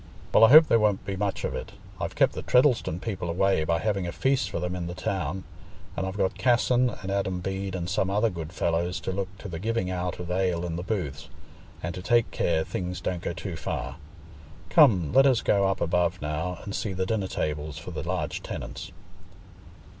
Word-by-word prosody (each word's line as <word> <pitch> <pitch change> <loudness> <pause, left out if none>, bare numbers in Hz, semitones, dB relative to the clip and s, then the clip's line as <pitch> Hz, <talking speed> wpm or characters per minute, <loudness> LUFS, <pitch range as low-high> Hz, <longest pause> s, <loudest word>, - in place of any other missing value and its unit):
"Well, - - +7
I - - +5
hope 155 +4 +10
there 115 - +4
won't 105 -3 +1
be 100 - -3
much 100 0 -2
of - - -2
it. - - -6 0.3
I've - - -4
kept - - +3
the - - -5
Treddleston 125 - +3
people 95 -5 -4
away 95 -1 +2
by 85 +1 +2
having 100 -2 -1
a - - -3
feast 130 -3 +1
for 95 - -3
them 90 +1 -2
in 85 -1 -4
the 90 - -5
town; 95 -3 -2 0.5
and 95 - -2
I've 95 +2 -5
got 95 -2 0
Casson 125 0 +3
and 95 -4 -6
Adam 95 -2 -1
Bede 95 +1 -3
and 85 -2 -3
some 95 +1 0
other 105 +3 +2
good 80 -2 -6
fellows 85 0 -1
to - - -3
look 95 0 -2
to 105 - -8
the 85 -4 -5
giving 110 -2 -1
out 90 -1 -3
of 90 0 -5
ale 90 -2 0
in 85 -2 -3
the 85 - -3
booths, 90 -9 -4 0.5
and 85 +1 -3
to 90 - -6
take 120 +4 +2
care 80 -2 +1
things 90 +1 -4
don't 90 -1 -3
go 85 - -3
too 90 0 -5
far. - - -4 0.7
Come, 90 - +5
let 135 +1 +7
us 130 -4 +3
go 100 -1 +3
up 95 - 0
above 90 +1 +1
now 80 +4 -3
and 100 - -6
see 100 -1 -2
the 95 0 -1
dinner 100 -1 -1
tables 75 -3 -3
for - - -8
the - - -4
large - - -3
tenants." - - -6
95 Hz, 215 wpm, -27 LUFS, 85-100 Hz, 0.7 s, hope